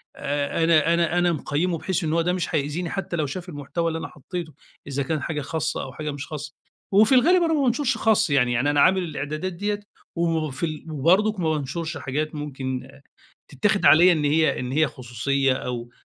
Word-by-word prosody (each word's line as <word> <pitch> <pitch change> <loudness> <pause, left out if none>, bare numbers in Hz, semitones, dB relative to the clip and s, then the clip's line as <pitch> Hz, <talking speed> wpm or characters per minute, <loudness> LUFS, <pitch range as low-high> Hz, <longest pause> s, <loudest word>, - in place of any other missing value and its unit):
آآ 145 +3 -1
أنا 165 0 +4
أنا 170 0 +1
أنا 175 0 +3
مقيّمه 165 +3 -1
بحيث 185 +2 -2
إن 155 -1 -1
هو 165 - +2
ده 180 +2 0
مش 180 -2 -2
هيأذيني 155 +4 -2
حتّى 190 -2 -3
لو 155 -3 0
شاف 175 +6 -6
المحتوى 155 +3 -3
اللي 165 0 -2
أنا - - -5
حطيته، 160 +2 -7 0.3
إذا 140 0 -2
كان 155 +2 -2
حاجة 150 +1 -3
خاصة 160 +2 -2
أو 130 - -8
حاجة 150 +1 -4
مش 140 0 -7
خاصة، 150 -1 -7 0.4
وفي 215 +6 +5
الغالب 345 +8 +5
أنا 325 -1 +1
ما 300 - +2
بانشرش 260 +1 +1
خاص 220 -6 +2
يعني، 130 -4 +3
يعني 125 +5 +1
أنا 145 -1 +3
عامل 190 +3 +4
الإعدادات 155 +3 -4
ديّة 205 +4 -2 0.4
وفي 160 -3 -1
ال 155 0 -6
وبرضك 185 +8 +2
ما 165 -3 +1
بانشرش 160 +2 -3
حاجات 145 +3 -3
ممكن 130 -3 -4 0.6
تتاخد 200 +9 +1
عليَّ 165 +5 +7
إن 155 -3 0
هي 155 +2 +2
إن 125 0 -4
هي 155 +3 +3
خصوصيّة 135 +2 -1
أو 120 -2 -5
155 Hz, 200 wpm, -24 LUFS, 145-175 Hz, 0.6 s, عليَّ